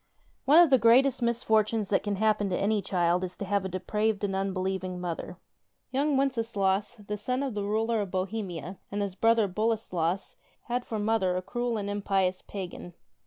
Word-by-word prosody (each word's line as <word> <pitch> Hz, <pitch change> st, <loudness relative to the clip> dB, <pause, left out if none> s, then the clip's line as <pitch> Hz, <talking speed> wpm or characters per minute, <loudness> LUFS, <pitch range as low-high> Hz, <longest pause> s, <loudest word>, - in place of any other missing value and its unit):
NE 315 Hz, +5 st, +8 dB
of 325 Hz, -, +1 dB
the 265 Hz, -, +6 dB
greatest 250 Hz, +4 st, +5 dB
misfortunes 220 Hz, -3 st, +1 dB
that 195 Hz, -, +2 dB
cani 205 Hz, -1 st, -2 dB
happen 210 Hz, -1 st, +2 dB
to 180 Hz, -, 0 dB
any 205 Hz, +1 st, +1 dB
child 180 Hz, -1 st, +1 dB
is 180 Hz, -1 st, -5 dB
to 200 Hz, -, -4 dB
have 200 Hz, 0 st, 0 dB
a 190 Hz, -, -3 dB
depraved 210 Hz, +3 st, -1 dB
and 195 Hz, -1 st, -1 dB
unbelieving 190 Hz, -1 st, -2 dB
mother. 175 Hz, 0 st, -5 dB, 0.5 s
Young 280 Hz, +2 st, +1 dB
Wenceslaus, 225 Hz, -6 st, 0 dB
the 210 Hz, 0 st, -4 dB
son 255 Hz, +5 st, -1 dB
of 270 Hz, -4 st, -3 dB
the 205 Hz, -1 st, -2 dB
Ruler 220 Hz, +2 st, 0 dB
of 200 Hz, -, -4 dB
Bohemia, 185 Hz, -3 st, -4 dB
and 205 Hz, 0 st, -1 dB
his 200 Hz, -2 st, -3 dB
brother 225 Hz, +1 st, +3 dB
Boleslas, 190 Hz, -4 st, -1 dB, 0.3 s
had 245 Hz, +1 st, -2 dB
for 220 Hz, -, -4 dB
mother 205 Hz, -4 st, +1 dB
a -, -, -1 dB
cruel 240 Hz, +2 st, -2 dB
and 200 Hz, -1 st, -3 dB
impious 195 Hz, -2 st, 0 dB
pagan. 180 Hz, -3 st, -7 dB
205 Hz, 180 wpm, -28 LUFS, 185-225 Hz, 0.5 s, NE